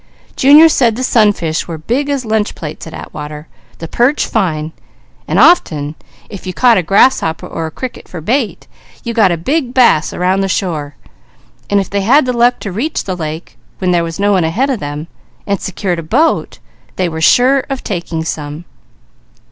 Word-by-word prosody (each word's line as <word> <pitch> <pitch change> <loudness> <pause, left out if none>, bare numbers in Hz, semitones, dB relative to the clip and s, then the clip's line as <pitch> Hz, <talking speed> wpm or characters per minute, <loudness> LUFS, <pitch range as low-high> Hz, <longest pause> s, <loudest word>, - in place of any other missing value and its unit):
Junior 295 +4 +7
said 245 -8 +2
the 255 - -3
sunfish 205 -10 +1
were 165 -2 -5
big 245 - -2
as 275 -3 -2
lunch 220 -1 -1
plates 155 -1 -7
at 160 - -10
Atwater, 150 +1 -8 0.3
the 165 - -7
perch 250 - +1
fine, 160 -7 -1 0.6
and - - -1
often 150 - +3 0.3
if 200 -3 -10
you 185 - -3
caught 240 -5 +4
a - - +1
grasshopper 180 -2 +2
or 165 - -4
a - - -5
cricket 255 +10 -7
for 180 - -8
bait, 225 - -2 0.4
you 235 - -4
got 215 -5 +3
a 170 - 0
big 260 - -2
bass 235 -12 +4
around 185 +2 0
the 195 - 0
shore, 160 -6 -3 0.7
and 205 - +3
if 195 - -2
they 200 0 -2
had 260 +8 +4
the 250 - -1
luck 240 +1 +3
to 200 - -5
reach 250 - -2
the 185 - -4
lake, 160 0 -7 0.2
when 185 -1 0
there 175 -1 +2
was 165 +1 -6
no 205 +1 +2
one 185 -3 +2
ahead 225 +13 0
of 250 - -2
them, 145 -1 -5 0.4
and 200 -2 -2
secured 185 -2 -3
a - - -3
boat 260 - 0 0.4
they 185 - 0
were 160 -1 -5
sure 255 +10 +4
of 270 -1 -4
taking 170 -5 -4
some. 150 +1 -5
195 Hz, 190 wpm, -14 LUFS, 160-245 Hz, 0.7 s, Junior